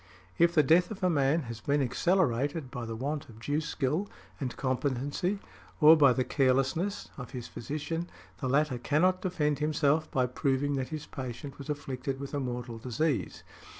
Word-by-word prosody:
If 170 0 +4
the 155 - +6
death 170 +6 +4
of 205 -3 -7
a 180 - +4
man 145 +1 +2
has 115 -4 -7
been 145 +4 +1
accelerated 140 -1 +1
by 125 -4 -5
the 115 - -4
want 140 +5 -3
of 110 -1 -13
due 145 +6 -1
skill 155 +6 -1 0.3
and 125 -4 -4
competency, 140 +8 -1 0.4
or 155 0 +9
by 145 -4 +6
the 130 +1 +1
carelessness, 135 +10 +1
of 125 - -7
his 125 -2 -5
physician, 155 +6 -4 0.3
the 130 - -2
latter 140 -2 +2
cannot 180 +8 +2
defend 150 -6 0
himself 150 0 +2
by 130 -1 +2
proving 135 +3 0
that 130 -1 -2
his 155 -1 -5
patient 130 +1 -7
was 140 - -8
afflicted 135 -2 -3
with 140 +1 -6
a 145 - 0
mortal 120 -3 -4
disease. 125 - -1
140 Hz, 175 wpm, -30 LUFS, 130-155 Hz, 0.4 s, or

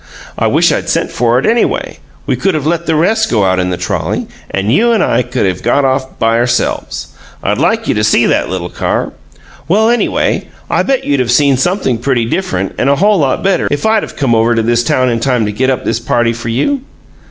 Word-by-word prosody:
I - - 0
wish - - +3
I'd - - -1
of - - -6
sent - - 0
for 120 0 +1
it, 130 - 0
anyway. 230 +1 0 0.3
We - - 0
could 195 -3 0
of 150 -2 -2
let 170 +1 -1
the 160 - +1
rest 220 +8 +1
go 105 -4 +2
out 95 0 +1
in 90 0 0
the 90 - -2
trolley, 90 -1 -2 0.2
and 100 +4 -1
you 235 - +3
and 225 - +2
I - - +1
could 125 -2 -2
of 95 -2 -2
got 135 +4 +1
off 130 0 -1
by 115 +1 +1
ourselves: 120 0 -1 0.3
I'd - - 0
like - - +1
you - - +2
to - - -1
see - - +3
that - - +1
little 90 -1 -4
car. - - -2 0.5
Well, 215 +7 +3
anyway, 240 - 0 0.2
I - - +2
bet 270 -1 0
you'd 140 -2 +1
of 120 - -2
seen 140 +1 +4
something 135 - 0
pretty 120 -2 0
different 95 - -2
and 135 - +2
a 140 - +4
whole 205 +5 +3
lot 135 -3 0
better 190 -2 +1
if 145 +6 -2
I'd 220 -1 +2
of - - -8
come 135 -5 0
over 115 +1 +2
to 115 - +1
this 120 +1 +1
town 130 +1 +1
in 115 -2 0
time 125 -2 0
to 105 - -2
get 130 +5 0
up 130 - -1
this - - 0
party 120 0 0
for 115 0 -6
you!" 255 - 0
130 Hz, 240 wpm, -13 LUFS, 115-170 Hz, 0.5 s, seen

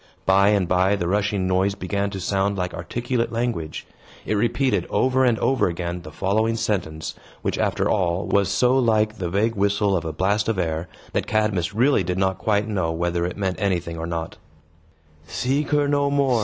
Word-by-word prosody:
By 95 +1 +5
and 100 -3 +3
by, 95 +2 +3
the 90 -4 -2
rushing 100 0 0
noise 95 +2 +1
began 100 +2 -2
to 100 -1 -6
sound 100 +2 0
like 90 -1 -2
articulate 120 +6 -2
language. 115 -10 -3 0.4
It - - -1
repeated, 115 -2 +1
over 130 0 +2
and 120 -3 +3
over 135 +3 +2
again, 85 0 -3
the 75 -2 -10
following 110 +6 0
sentence, 85 -8 -2 0.3
which, - - -1
after - - +1
all, 90 -2 0
was 100 -1 +2
so 125 +7 +3
like 110 -3 +1
the 90 -2 -2
vague 105 +5 +1
whistle 100 0 +1
of 85 - -1
a 80 - -3
blast 100 +7 0
of 110 - 0
air, 80 -1 -2 0.3
that - - -1
Cadmus 105 -3 0
really 130 +1 +3
did 90 +1 -2
not 95 -1 0
quite 105 0 +1
know 95 -6 -1
whether 85 +1 -1
it 90 - -6
meant 95 -2 -1
anything 85 -4 -1
or 80 - -4
not: 85 -1 -4 0.9
"Seek 135 - -1
her 145 -1 +2
no 145 0 +2
more! 140 -4 +2
100 Hz, 190 wpm, -23 LUFS, 90-110 Hz, 0.9 s, By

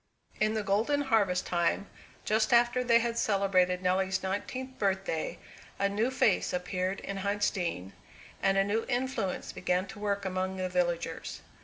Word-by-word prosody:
In 215 +1 +2
the 215 - -1
golden 220 +9 +1
harvest 215 -9 +2
time, 175 +2 +1 0.4
just 215 +2 +2
after 240 +1 +4
they 235 -1 +5
had 235 0 0
celebrated 185 -3 +2
Nelly's 190 +1 +1
nineteenth 255 +7 -4
birthday, 190 -5 -1 0.4
a 200 - +2
new 210 +5 0
face 245 -6 +2
appeared 185 +1 -2
in 195 - -5
Huntsdean, 190 - -1 0.5
and 195 0 +3
a 195 - +5
new 210 +3 0
influence 245 -6 -1
began 180 +1 0
to 210 - -9
work 200 -1 -1
among 185 0 -2
the 185 -1 -2
villagers. 175 -2 -2
195 Hz, 150 wpm, -30 LUFS, 185-220 Hz, 0.5 s, they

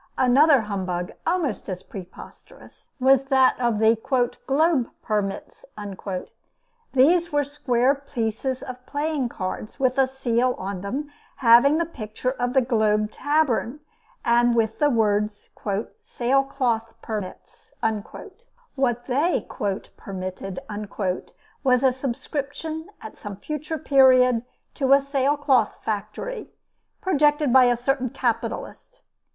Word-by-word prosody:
Another 270 +2 +5
humbug 185 -4 -3 0.2
almost 330 - -1
as 185 -1 -5
preposterous, 185 -2 -12
was 265 +1 +4
that 265 -1 +4
of 235 -3 +1
the 220 +1 +4 0.5
"Globe 280 -2 +2
Permits." 205 -2 -3 1.3
These 335 +6 +4
were 290 0 +2
square 270 -2 +1
pieces 260 -2 -3
of 250 -1 -8
playing 290 -3 -1
cards 205 +5 -5
with 260 0 +1
a 265 - +5
seal 255 -1 0
on 190 -1 -5
them, 280 +9 -4 0.2
having 245 +5 +6
the 335 - +1
picture 250 -4 -4
of 245 -1 -2
the 265 - +5
Globe 215 -3 +1
Tavern, 290 -3 0 0.5
and 240 0 +4
with 220 -1 0
the 295 -1 +4
words, 210 -3 0 0.5
"Sailcloth 250 -3 0
Permits." 210 -5 -7 1.0
What 245 -3 0
they 285 +7 0 0.5
"permitted" 185 0 -6 1.0
was 250 -1 +3
a 260 -1 +4
subscription 285 +5 -4
at 220 - -9
some 205 -1 -7
future 305 +8 -5
period 255 -5 +5 0.3
to 270 -2 +3
a 275 - +7
sailcloth 275 -3 +1
factory, 220 - -4 0.5
projected 295 -6 +2
by 260 -1 +8
a 245 -1 +3
certain 255 +1 0
capitalist. 245 - -3
255 Hz, 110 wpm, -24 LUFS, 225-280 Hz, 1.3 s, by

